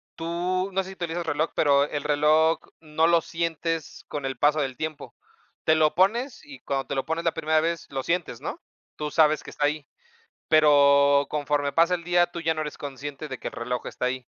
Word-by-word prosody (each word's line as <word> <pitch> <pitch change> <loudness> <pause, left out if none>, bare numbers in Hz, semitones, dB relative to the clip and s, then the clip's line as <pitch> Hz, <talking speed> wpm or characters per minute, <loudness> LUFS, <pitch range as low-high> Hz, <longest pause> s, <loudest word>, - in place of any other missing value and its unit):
Tú, 180 +3 -2
no 190 - +2
sé 190 - -9
si - - -8
utilizas 175 -1 -4
el 165 - -2
reloj, 155 +3 -1
pero 140 -2 +4
el 145 0 -3
reloj 155 +2 +3 0.2
no 160 0 0
lo 170 0 +4
sientes 165 -1 -3
con 145 -2 -5
el 135 -1 -3
paso 150 +1 +3
del 135 -2 -3
tiempo. 155 +2 -6 0.5
Te 160 - +4
lo 155 -1 +3
pones 230 +8 +1
y 290 -3 -12
cuando 135 -1 -3
te 140 - -3
lo 135 - -1
pones 165 +1 -2
la 165 - +2
primera 160 0 +1
vez, 165 0 -2
lo 135 -1 -2
sientes, 170 -6 -2
¿no? - - -5 0.4
Tú 150 -1 -4
sabes 155 0 +3
que - - -10
está 145 - -1
ahí, 150 0 -3 0.6
pero, 140 -2 +5
conforme 145 -1 0
pasa 170 +4 +4
el 170 - -8
día, 175 0 +3
tú 175 -1 -7
ya 165 0 +1
no 155 - -3
eres 150 -1 -5
consciente 145 +1 -7
de 130 -3 -7
que - - -5
el - - -6
reloj 125 +1 -4
está - - -4
ahí. 130 0 -2
155 Hz, 220 wpm, -25 LUFS, 145-170 Hz, 0.6 s, pero